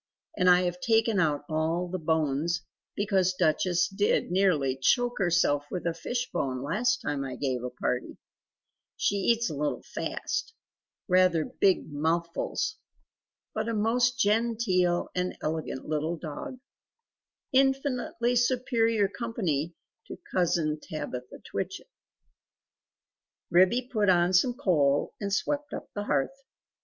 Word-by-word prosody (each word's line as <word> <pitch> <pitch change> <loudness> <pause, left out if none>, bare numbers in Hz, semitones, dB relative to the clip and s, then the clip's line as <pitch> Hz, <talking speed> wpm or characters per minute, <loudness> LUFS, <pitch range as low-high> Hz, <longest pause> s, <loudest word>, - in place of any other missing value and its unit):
And 180 - +3
I 180 0 +6
have 180 0 -2
taken 225 -2 +2
out 150 -4 +1
all 160 +3 0
the 185 +1 -4
bones; 160 +1 0 0.3
because 190 -3 +1
Duchess 175 +2 +2
did 200 -2 0
nearly 170 -9 +2
choke 245 - +1
herself 170 -6 +2
with 180 - -4
a 170 - +1
fish 245 +9 -3
bone 130 -1 -2
last 225 - 0
time 145 -2 -2
I 130 -2 -5
gave 130 -2 -2
a 125 - -3
party. 125 0 -3 0.8
She 200 - +1
eats 230 +4 +2
a - - -4
little 150 +1 -2
fast 450 - -4 0.5
rather 180 -4 +4
big 190 -5 +1
mouthfuls. 165 +3 -1 0.8
But 220 +1 -2
a 230 - -1
most 235 +3 +2
genteel 205 -5 +2
and 180 0 -2
elegant 155 -4 -4
little 155 +2 -1
dog 180 - -7 1.0
infinitely 260 -3 +1
superior 230 -4 +2
company 180 - -2 0.3
to - - -8 0.2
Cousin 165 -4 +1
Tabitha 125 -5 -7
Twitchit." - - -4 1.6
Ribby 185 +8 +4
put 215 -6 +1
on 175 0 +4
some 240 +7 +3
coal 150 - +2
and 200 -1 -2
swept 290 +8 -1
up - - -9
the 205 0 -4
hearth. 180 - -1
180 Hz, 125 wpm, -28 LUFS, 155-225 Hz, 1.6 s, I